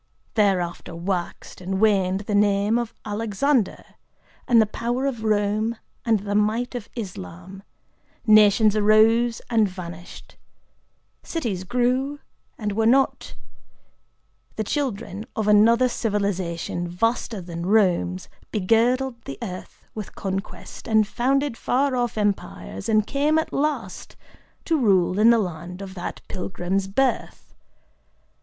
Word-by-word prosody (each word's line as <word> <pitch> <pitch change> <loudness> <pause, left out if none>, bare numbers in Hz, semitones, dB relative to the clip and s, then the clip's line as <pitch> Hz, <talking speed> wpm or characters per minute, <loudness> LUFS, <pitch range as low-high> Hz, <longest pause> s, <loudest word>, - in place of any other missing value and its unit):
Thereafter 185 -6 0
waxed 175 +1 -4
and 190 +1 -2
waned 195 -3 +2
the 210 0 -4
name 205 +2 +3
of 235 -2 -5
Alexander, 220 +3 0 0.6
and 235 -2 +5
the 220 - +5
power 240 +5 -2
of 245 -5 -2
Rome 215 +1 +1 0.3
and 225 -4 +2
the 205 0 -3
might 215 +5 +1
of 235 -3 -6
Islam;—nations 200 - 0
arose 220 +3 +4
and 220 -3 +4
vanished;—cities 185 - -9
grew 250 +6 0 0.4
and 210 -2 -2
were 220 +2 +1
not;—the 260 -3 -4
children 220 -5 -3
of 220 -2 -1
another 230 +4 +5
civilization, 190 -7 -2
vaster 225 +4 -1
than 170 -1 -6
Romes, 180 - +2 0.2
begirdled 235 +5 +1
the 135 - -6
earth 185 -4 -8
with 215 -3 -7
conquest, 195 0 -6
and 220 -1 +4
founded 270 +3 0
far 265 +3 0
off 240 -3 -1
empires, 205 0 -2
and 215 -1 +3
came 295 +5 +1
at 320 - -1
last 275 -10 -2 0.5
to 325 -2 +1
rule 190 -5 +3
in 220 +2 +6
the 235 - +6
land 180 -2 -4
of 195 -1 -7
that 180 -2 -6
pilgrim's 190 0 -2
birth. 260 +7 -1
215 Hz, 115 wpm, -23 LUFS, 190-235 Hz, 0.6 s, in